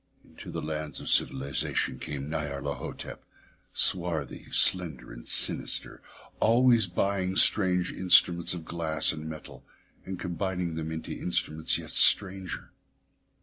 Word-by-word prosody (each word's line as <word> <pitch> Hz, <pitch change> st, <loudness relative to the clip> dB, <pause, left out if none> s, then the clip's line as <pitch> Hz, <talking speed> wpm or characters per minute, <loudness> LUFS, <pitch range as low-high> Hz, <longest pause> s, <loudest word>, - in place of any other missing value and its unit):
Into -, -, -14 dB
the -, -, -6 dB
lands 75 Hz, -1 st, -6 dB
of -, -, -6 dB
civilisation 65 Hz, -1 st, -1 dB
came 70 Hz, -2 st, -7 dB
Nyarlathotep, 75 Hz, -3 st, -6 dB, 0.5 s
swarthy, 85 Hz, -7 st, -2 dB
slender, 85 Hz, -7 st, +2 dB
and -, -, -13 dB
sinister, -, -, +3 dB, 0.4 s
always 120 Hz, -2 st, +3 dB
buying 95 Hz, +1 st, -2 dB
strange 90 Hz, -3 st, +3 dB
instruments 90 Hz, -1 st, +4 dB
of 85 Hz, -2 st, -9 dB
glass 80 Hz, -2 st, 0 dB
and 80 Hz, 0 st, -8 dB
metal 80 Hz, -1 st, -11 dB, 0.4 s
and 95 Hz, -1 st, -8 dB
combining 90 Hz, -1 st, -4 dB
them 80 Hz, 0 st, -6 dB
into 80 Hz, 0 st, -7 dB
instruments 80 Hz, -3 st, -1 dB
yet -, -, -9 dB
stranger. 95 Hz, -2 st, +3 dB
85 Hz, 115 wpm, -26 LUFS, 75-95 Hz, 0.5 s, instruments